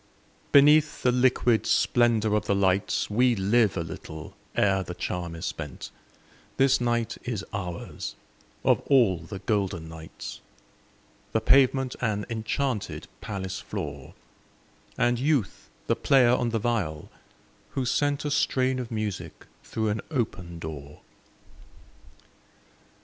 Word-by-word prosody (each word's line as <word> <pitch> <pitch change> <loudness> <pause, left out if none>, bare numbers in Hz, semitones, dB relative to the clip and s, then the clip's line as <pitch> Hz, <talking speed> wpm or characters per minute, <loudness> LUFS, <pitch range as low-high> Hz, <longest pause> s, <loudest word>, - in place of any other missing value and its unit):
Beneath 150 +2 +5
the 125 - +4
liquid 125 -2 +3
splendor 115 -3 +3
of 105 - -1
the 100 - +2
lights 95 0 +1
We 125 +3 +3
live 105 +2 +2
a 85 - 0
little 80 -1 -9 0.2
ere 95 -1 +3
the 90 -1 -6
charm 85 -1 -4
is 80 - -6
spent; 75 -5 -6 0.7
This 135 -2 +4
night 120 -1 0
is 110 -5 -3
ours, 90 -4 -5 0.5
of - - +4
all 120 -11 +4
the 85 +5 -8
golden 95 -4 -1
nights, 80 0 -9 0.9
The 110 - +3
pavement 130 +2 +4
an 105 -4 0
enchanted 115 +1 -2
palace 95 -3 -4
floor, 70 -3 -6 0.8
And 120 0 +2
Youth 135 -6 0 0.2
the - - +2
player 130 -3 +4
on 125 -1 +2
the 115 - 0
viol, 105 -10 -2 0.6
who 130 - 0
sent 145 +3 0
A 145 - -1
strain 130 -2 +1
of 125 -2 -5
music 100 -7 -4 0.2
through 110 -1 -2
an 105 0 -1
open 95 - -3
door. 75 -3 -8
110 Hz, 125 wpm, -27 LUFS, 90-125 Hz, 0.9 s, Beneath